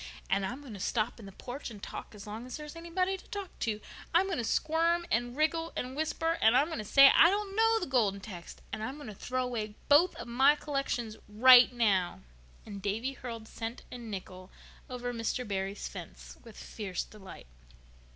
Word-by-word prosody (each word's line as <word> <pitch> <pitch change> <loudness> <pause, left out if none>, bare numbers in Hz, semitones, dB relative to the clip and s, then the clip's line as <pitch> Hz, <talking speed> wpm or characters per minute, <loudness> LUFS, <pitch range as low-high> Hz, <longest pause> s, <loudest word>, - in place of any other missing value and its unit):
"And 195 0 +2
I'm 255 +6 -6
going 265 -6 -10
to 200 - -8
stop 225 +4 -1
in 210 - -10
the - - -9
porch 250 +8 -7
and 220 - -10
talk - - -7
as 200 - -10
long 220 +4 -7
as 255 - -6
there's 300 +1 -9
anybody 340 +3 -1
there 385 - -1
to - - -18
talk 405 -5 -7
to. 215 -2 -1 0.4
I'm 360 +3 +5
going 385 -8 -2
to - - -1
squirm 330 +7 +1
and 240 +2 0
wriggle 325 +2 +1
and 255 +1 -4
whisper, 325 +2 -1
and 220 +3 +6
I'm 290 +5 +3
going 320 - -4
to - - -3
say 275 +6 +8
I 335 - +8
don't 400 0 -2
know 450 +1 +4
the 360 - -2
Golden 220 -7 +1
Text. 185 -4 -10
And - - -3
I'm 260 +5 -4
going 290 -6 -9
to - - -7
throw 255 +5 -2
away 220 -4 -4
both 310 +5 +6
of - - -8
my 265 +5 +5
collections 275 -7 -3
right 250 +4 +8
now." 200 -7 +1 0.4
And 200 -2 -8
Davy 220 +7 -2
hurled 230 -4 -7
cent 225 +2 -6
and 240 -2 -8
nickel 185 -2 -7 0.4
over 245 -1 -4
Mr. 230 +1 -2
Barry's 195 0 -3
fence - - -10
with 230 -3 -13
fierce 195 -5 -5
delight. 200 -3 -12
245 Hz, 210 wpm, -31 LUFS, 215-300 Hz, 0.4 s, say